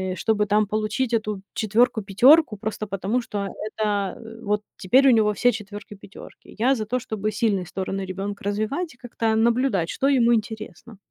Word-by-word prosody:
чтобы 210 -1 0
там 210 +1 +3
получить 215 +4 -2
эту 215 -3 -1
четвёрку-пятёрку 220 +4 +3
просто 215 0 -4
потому, 200 +5 -1
что 205 -3 -4
это, 205 -1 -3
э, 225 0 -11
вот 210 0 0 0.2
теперь 260 +9 +4
у - - +7
него 215 -3 +3
все 245 +4 +3
четвёрки-пятёрки. 205 -1 -11
Я 255 +5 +3
за 220 -4 -3
то, 250 - 0
чтобы 215 -4 -3
сильные 200 -7 0
стороны 195 +1 -4
ребёнка 195 +2 -5
развивать 215 - -2
и - - -29
как-то 230 -2 -2
наблюдать, 230 -6 +1
что 275 - 0
ему 240 -4 +4
интересно. 220 0 -5
215 Hz, 160 wpm, -23 LUFS, 205-235 Hz, 0.2 s, у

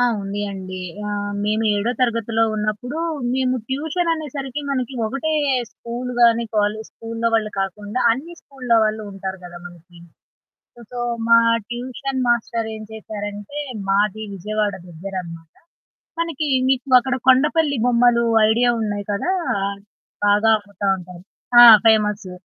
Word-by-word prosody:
ఆ! - - +4 0.2
ఉంది 200 +1 -4
అండి. 185 -1 -7 0.3
ఆహ్, 205 0 -3
మేము 215 +1 0
ఏడో 205 +3 0
తరగతిలో 230 -2 +1
ఉన్నప్పుడు, 215 +7 -3 0.4
మేము 255 -1 +1
ట్యూషన్ 320 +6 -1
అనేసరికి 290 -3 -5
మనకి 260 -1 -2
ఒకటే 275 +7 -2 0.4
స్కూలు 245 +2 -6
గాని 235 0 +5
కాలేజు 210 +1 0
స్కూల్లో 230 0 -3
వాళ్ళు 215 -1 +1
కాకుండా 205 +4 -3
అన్ని 305 +9 -6
స్కూల్లో 250 -4 -1
వాళ్ళు 215 0 -1
ఉంటారు 190 -1 -6
గదా! 175 0 -9
మనకి. 175 0 -15 0.9
సో, 245 - -7 0.3
మా 230 0 +7 0.3
ట్యూషన్ 260 +2 -4
మాస్టరేం 225 -2 -1
చేశారంటే, 205 +3 -7 0.3
మాది 210 +2 +1
విజయవాడ 210 +2 -2 0.2
దగ్గరనమాట. 170 -2 -8 0.7
మనకి 320 -3 -2 0.2
మీకు 260 0 +2
అక్కడ 265 +1 -2
కొండపల్లి 285 +2 +4
బొమ్మలు 240 -1 +4 0.3
ఐడియా 240 +2 +3
ఉన్నాయి 205 -2 -3
కదా! 205 - -1 0.3
ఆహ్, 200 0 -3 0.5
బాగా 205 +2 +4
అమ్ముతా 205 -1 -6
ఉంటారు. 180 -1 -11 0.4
ఆ! - - +11 0.2
ఫేమస్ 210 -3 +2
220 Hz, 125 wpm, -21 LUFS, 205-255 Hz, 0.9 s, ఆ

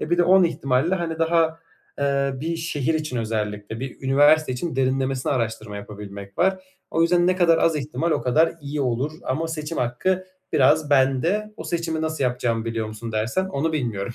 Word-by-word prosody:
E, 155 - -4
bir 175 - +2
de - - +6
10 185 +1 +6
ihtimalle, 140 +1 +1
hani, 165 -3 -3
daha, 165 0 +2 0.4
eee, 140 -1 +1
bir 165 +2 -2
şehir 160 -2 -1
için 155 -5 -2
özellikle, 110 -1 -3
bir 130 0 -5
üniversite 145 +2 +4
için 130 +3 -4
derinlemesine 135 0 0
araştırma 110 -4 -3
yapabilmek 100 -1 -9
var. 190 +1 +3 0.3
O 165 - +2
yüzden 175 +1 +3
ne 185 0 +2
kadar 170 -3 +4
az 165 -1 +2
ihtimal, 150 +3 -2
o - - +1
kadar 155 +7 +3
iyi 145 +1 -4
olur 130 +3 -1
ama 160 +5 -1
seçim 160 0 -4
hakkı 180 +10 0 0.3
biraz 150 +2 +3
bende. 145 +11 +2
O - - -8
seçimi 165 -2 -2
nasıl 160 -3 -1
yapacağımı 120 -2 0
biliyor 115 -1 -2
musun 110 +1 -7
dersen, 110 +12 0
onu 160 0 -1
bilmiyorum. 120 -8 -2
140 Hz, 180 wpm, -23 LUFS, 120-165 Hz, 0.4 s, de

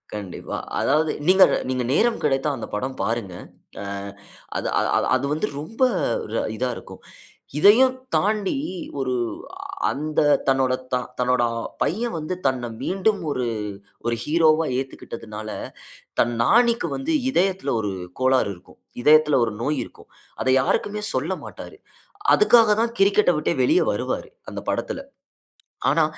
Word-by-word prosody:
கண்டிப்பா. 100 -4 -6 0.2
அதாவது, 155 +3 +2 0.2
நீங்க 190 +1 +8 0.3
நீங்க 130 -1 -1
நேரம் 230 +7 +2
கிடைத்தா 135 +1 +1
அந்த 115 - -6
படம் 130 +5 -4
பாருங்க. 110 -5 -2 0.5
ஆ - - -6 0.7
அது - - -2 0.5
அது 130 - -2
வந்து 155 +8 0
ரொம்ப 225 - -10 0.5
ர 115 - -1 0.2
இதா 125 +1 -1
இருக்கும். - - -11 0.6
இதையும் 240 +9 +6 0.2
தாண்டி 210 +4 +1 0.4
ஒரு 130 -1 -1 0.5
அ - - -8 0.3
அந்த 155 +2 -1 0.3
தன்னோட 130 -1 +3 0.2
த - - +3 0.2
தன்னோட 125 0 +2 0.4
பையன் 230 +7 -1
வந்து 155 +4 -3
தன்ன 125 -3 -1
மீண்டும் 195 +2 +1
ஒரு 125 -3 -1 0.6
ஒரு 120 0 +1
ஹீரோவா 160 0 +3
ஏத்துக்கிட்டதுனால, 110 -5 -6 0.7
தன் 120 0 +2
நானிக்கு 235 - +3
வந்து 280 +4 -2 0.2
இதயத்தில, 185 - +1
ஒரு 100 -2 -2 0.3
கோளாறு 130 -4 +3
இருக்கும். 85 - -19 0.2
இதயத்தில 150 0 +5
ஒரு 110 - -4
நோய் 150 +2 0
இருக்கும். - - -16 0.3
அதை 130 - +2
யாருக்குமே 210 +9 0
சொல்லமாட்டாரு. - - -4 0.6
அதுக்காக 230 - +5
தான் 235 0 -1
கிரிக்கெட்ட 195 -1 +4
விட்டே 160 - 0
வெளியே 350 +9 +3
வருவாரு. - - -3 0.2
அந்த - - -6
படத்தில. - - -3 0.9
ஆனா, - - +3
150 Hz, 130 wpm, -23 LUFS, 125-205 Hz, 0.9 s, நீங்க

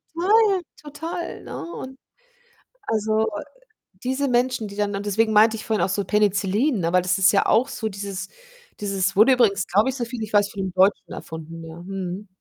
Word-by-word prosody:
Total, 400 +2 +3 0.2
total, 325 +4 -6
ne? 340 - -7
Und, 265 0 -8 0.9
also, 220 0 +1 0.8
diese 265 +2 0
Menschen, 245 -3 +1
die 200 - -10
dann 205 -1 -1
und 200 - -4
deswegen 220 +2 +1
meinte 220 +1 +5
ich - - -8
vorhin 220 -2 0
auch - - 0
so 200 +1 -1
Penicillin, 210 +5 +1
ne? 170 0 -1
Weil 180 - +5
das 185 +1 +1
ist 195 +1 +5
ja 195 - +3
auch 240 +5 +3
so 220 - -4
dieses 195 -1 -6 0.5
dieses 195 -2 -1
wurde 225 +6 +6
übrigens, 205 -7 +2
glaube 205 +8 +2
ich, 265 - -3
so 245 - -2
viel 235 -2 -6
ich 215 - -8
weiß, 205 -1 +4
von 200 - -5
'nem 185 -2 -3
Deutschen 190 +2 +2
erfunden, 165 +1 -8
ja. 165 +1 -10
Mhm. 190 +1 -5
210 Hz, 195 wpm, -23 LUFS, 195-245 Hz, 0.9 s, wurde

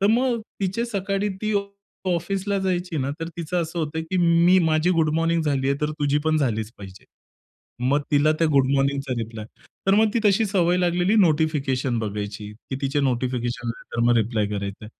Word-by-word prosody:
तर 200 - +3
मग 240 0 +2 0.2
तिचे 195 +4 -1
सकाळी 200 -2 -1
ती 215 0 0 0.6
ऑफिसला 195 +3 -1
जायची 180 -3 -2
ना 135 0 -1
तर 165 - -3
तिचं 170 +1 -1
असं 165 +1 -5
होतं, 160 0 -2
की 165 +3 -3
मी 170 +1 +5
माझी 160 0 +2
गुड 165 -3 +2
मॉर्निंग 165 0 +1
झालीये, 140 -2 +1
तर 150 - 0
तुझी 145 0 +1
पण 155 0 +2
झालीच 110 -7 -1
पाहिजे. 95 -1 -11 0.8
मग 145 +2 +3
तिला 150 +1 +4
त्या 165 - +3
गुड 135 -2 +4
मॉर्निंगचा 140 -1 0
रिप्लाय. 110 -1 -6 0.4
तर 195 - +5
मग 220 +1 +4
ती - - +3
तशी 205 +2 +4
सवय 180 -3 +2
लागलेली 180 +2 +2
नोटिफिकेशन 150 - +1
बघायची, 105 -1 -4 0.2
की 130 - -2
तिचे 140 +2 0
नोटिफिकेशन 125 -2 -1
आले 115 - -5
तर - - 0
मग 120 0 +4
रिप्लाय 110 -1 +1
करायचं. 100 0 -5
155 Hz, 180 wpm, -23 LUFS, 130-180 Hz, 0.8 s, मी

